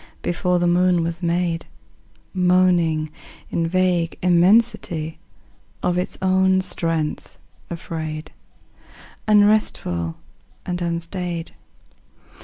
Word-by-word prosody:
Before 180 +1 0
the 175 - +1
moon 175 0 +3
was 170 +1 -3
made, 170 -1 -1 0.7
Moaning 180 -4 +2 0.4
in 165 -1 0
vague 180 -1 +1
immensity, 180 -3 +2 0.6
Of 180 - +1
its 180 +1 -2
own 190 0 +3
strength 165 -4 -2 0.3
afraid, 160 -2 -5 1.0
Unresful 205 - +2 0.5
and 175 -1 -3
unstaid. 170 0 -3
175 Hz, 80 wpm, -22 LUFS, 165-185 Hz, 1.0 s, moon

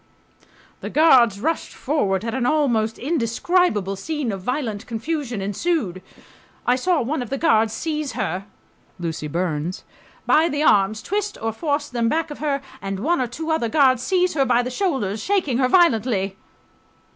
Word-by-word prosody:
The - - -6
guards 250 -10 +5
rushed 320 +8 -2
forward 210 -10 0
and 230 +1 -2
an 250 -2 0
almost 240 -7 +1
indescribable 240 - +1
scene 295 +3 -3
of 195 -1 -5
violent 240 -2 -3
confusion 245 -2 -3
ensued. 205 - -1 0.6
I... 245 - +3
saw 330 +3 +1
one 270 +3 -2
of 245 - -5
the 275 - -2
guards 225 -9 +3
seize 305 +4 -3
her 185 +4 -3 0.5
[Lucy 165 -3 -4
Burns] 170 +1 -2 0.4
by 325 +2 +4
the 290 +1 -1
arms, 210 -4 +3
twist 415 +1 -2
or 225 0 -2
force 290 +3 -1
them 235 -2 0
back 325 +2 -1
of 295 - -8
her, 280 -2 -1 0.2
and 195 0 -4
one 320 +3 +1
or 250 - 0
two 320 +7 -4
other 280 -8 0
guards 260 -3 +4
seize 360 +6 +1
her 280 -3 +2
by 245 -2 +2
the 250 - -4
shoulders, 250 - -1
shaking 345 - 0
her 255 - +3
violently 225 - +2
250 Hz, 165 wpm, -22 LUFS, 215-310 Hz, 0.6 s, guards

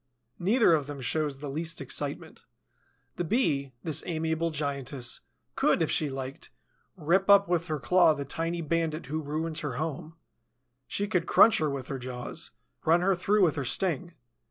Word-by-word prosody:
Neither 205 +1 +4
of 150 -3 +1
them 145 -1 -7
shows 145 +2 -1
the 145 +1 -7
least 165 +3 -3
excitement. - - -4 0.7
The 175 - -1
Bee, 145 - 0
this 160 -2 +1
amiable 160 0 -1
giantess, 140 -4 -2 0.4
could, - - +2
if - - -1
she 150 - +2
liked, 135 0 -7 0.5
rip 185 +5 +1
up 200 0 +7
with 175 -1 0
her 155 -2 -1
claw 170 +2 +4
the 140 -1 -5
tiny 165 +4 -2
bandit 165 0 -1
who 155 +4 -3
ruins 155 +2 -3
her 145 -4 -4
home; 155 +2 -4 0.7
she 205 - -1
could 180 -4 0
crunch 225 - +6
her 155 -1 +1
with 140 -2 -4
her 135 - -4
jaws, 125 -1 -5 0.3
run 165 +2 +4
her 195 +2 +3
through 200 +3 +2
with 165 -5 +3
her 140 - -1
sting. 175 +4 0
160 Hz, 170 wpm, -28 LUFS, 140-175 Hz, 0.7 s, up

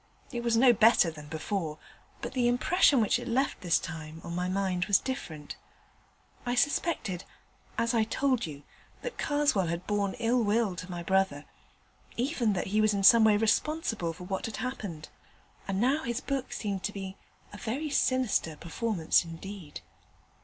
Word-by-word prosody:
It 240 -3 -3
was 235 -1 +1
no 245 +1 +7
better 220 -6 +5
than 150 -2 -11
before, 160 0 -3 0.5
but - - -4
the 250 -2 +2
impression 265 +2 +4
which 215 +2 +2
it 245 - -7
left 260 +3 0
this 175 -2 +3
time 160 -2 -7
on 170 - -6
my 180 +1 -1
mind 185 -2 0
was 200 -1 +5
different. 160 - -6 0.9
I 245 0 -1
suspected 245 - 0 0.5
as 230 +1 +1
I 225 -2 +3
told 255 -2 0
you 145 -2 -9 0.4
that - - -6
Karswell 290 - +2
had 170 +2 -3
borne 205 -2 0
ill 240 0 +1
will 210 -2 +1
to 180 +2 -7
my 175 -1 -5
brother, 190 -6 +1 0.7
even 245 -4 +1
that 180 - -2
he 215 - +4
was 215 -1 +3
in 195 - -1
some 230 +3 +8
way 215 -1 +5
responsible 225 - 0
for 165 - -10
what 190 +3 -3
had 225 - -6
happened; 200 - -5 0.6
and 195 -1 -1
now 265 +7 +2
his 235 -2 -2
book 275 -2 -3
seemed 200 -3 -3
to 210 - -1
me 195 -1 -5
to - - -16
be - - -30 0.4
a - - -7
very 280 +7 -3
sinister 255 - +1
performance 170 +2 +1
indeed. 170 0 -8
210 Hz, 175 wpm, -29 LUFS, 180-245 Hz, 0.9 s, some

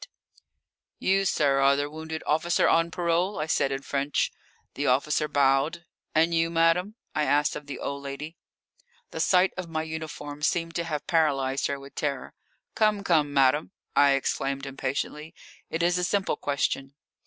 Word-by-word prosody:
"You, 195 +1 +2
sir, 140 -6 +2
are 135 0 +5
the 145 +1 -1
wounded 160 +1 -6
officer 160 +3 +2
on 165 0 +3
parole?" 175 +3 0
I 150 - -1
said 140 -3 +1
in 135 0 -3
French. 140 +1 0 0.4
The 145 - -2
officer 150 +4 +2
bowed. 145 +4 +2 0.3
"And 165 +2 +3
you, 165 0 +2
madame?" 170 +5 +2 0.2
I 155 -1 +1
asked 145 0 +2
of 150 - -8
the 140 - -5
old 140 0 -4
lady. 140 +4 -7 0.8
The 160 - -6
sight 180 +3 +3
of 180 -2 -5
my 160 -1 -2
uniform 155 -2 -6
seemed 165 +2 0
to 170 - -2
have 150 -3 -3
paralysed 140 -6 +1
her 140 -1 -3
with 140 0 -12
terror. 140 -3 -3 0.4
"Come, 215 -2 +2
come, 155 -6 +2
madame," 140 +5 +2 0.2
I 140 -1 +6
exclaimed 135 0 -1
impatiently; 140 +3 -4 0.3
"it 165 +1 -2
is 175 +1 +2
a - - -1
simple 195 -2 0
question." 140 -1 -2
150 Hz, 165 wpm, -27 LUFS, 140-165 Hz, 0.8 s, I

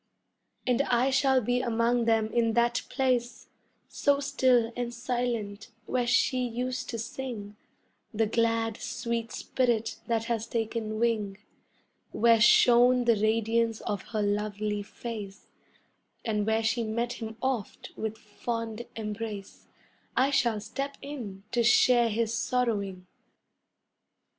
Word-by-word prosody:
And 250 +1 +2
I 255 -1 +2
shall 265 -1 +3
be 245 +2 0
among 235 0 +1
them 225 -1 +2
in 230 -1 +2
that 235 +1 +2
place 250 -3 -1 0.4
So 285 -1 +1
still 250 -4 +2
and 245 -1 -3
silent, 235 -4 -3 0.2
where 250 -1 0
she 255 +1 +3
used 250 +2 -3
to 230 - -3
sing 230 -3 -6 0.6
The 225 0 +1
glad, 225 0 0
sweet 235 -2 -3
spirit 235 -4 -1
that 230 -1 +1
has 230 -1 -2
taken 225 -1 -2
wing 215 -4 0 0.8
Where 230 -1 +4
shone 245 +2 +6
the 235 -1 +5
radiance 225 +1 +1
of 200 -2 -3
her 215 -2 -1
lovely 210 0 -1
face, 210 -1 -7 0.8
And 210 -2 0
where 220 0 +2
she 230 +2 +1
met 235 +2 -2
him 220 -1 -7
oft 260 -5 -3
with 220 0 -4
fond 230 +1 -5
embrace, 210 -2 -6 0.5
I 270 +2 +4
shall 235 -6 +2
step 275 +6 -5
in 230 -10 -7
to 240 - +2
share 240 0 +5
his 225 +1 0
sorrowing. 210 -6 -1
230 Hz, 125 wpm, -28 LUFS, 215-245 Hz, 0.8 s, shone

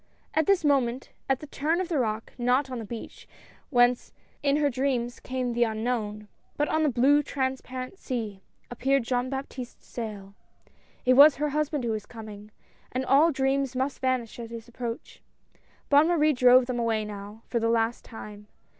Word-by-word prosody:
At 315 -1 +1
this 385 -5 +3
moment, 265 -3 +1 0.2
at 265 -1 +1
the - - -7
turn 305 +4 -1
of 370 - -1
the 320 -5 0
rock, 220 -2 -2
not 255 +3 +2
on 250 - -4
the 225 - -6
beach 230 +2 -9 0.4
whence 245 -2 +3 0.3
in 280 -1 +2
her 295 -1 +2
dreams, 255 -2 -1
came 255 -2 -3
the 240 +1 +3
unknown 220 -2 -2
— - - -40
but 295 - +1
on 315 - +1
the 305 - +3
blue 270 +4 +4
transparent 260 +2 -4
sea 220 -7 -4 0.2
— - - -32
appeared 270 +2 +1
Jean 250 +1 -1
Baptiste's 265 -2 -6
sail. 205 -4 -7 0.7
It 255 - +5
was 285 +3 +8
her 300 +1 -1
husband 295 -1 -1
who 235 - -1
was 215 -2 -4
coming 215 -2 -10 0.2
— - - -33
and 255 +1 -2
all 290 +6 +5
dreams 270 -1 0
must 265 +2 -1
vanish 255 -3 -1
at 230 -1 -6
his 230 0 -8
approach. 240 0 -6 0.7
Bonne 290 +2 +5
Marie 310 -3 +3
drove 250 0 +6
them 245 -1 -3
away 225 -2 0
now 205 +1 -9
for 235 - -1
the 230 0 +1
last 230 0 +1
time. 210 -2 -10
250 Hz, 185 wpm, -27 LUFS, 230-275 Hz, 0.7 s, was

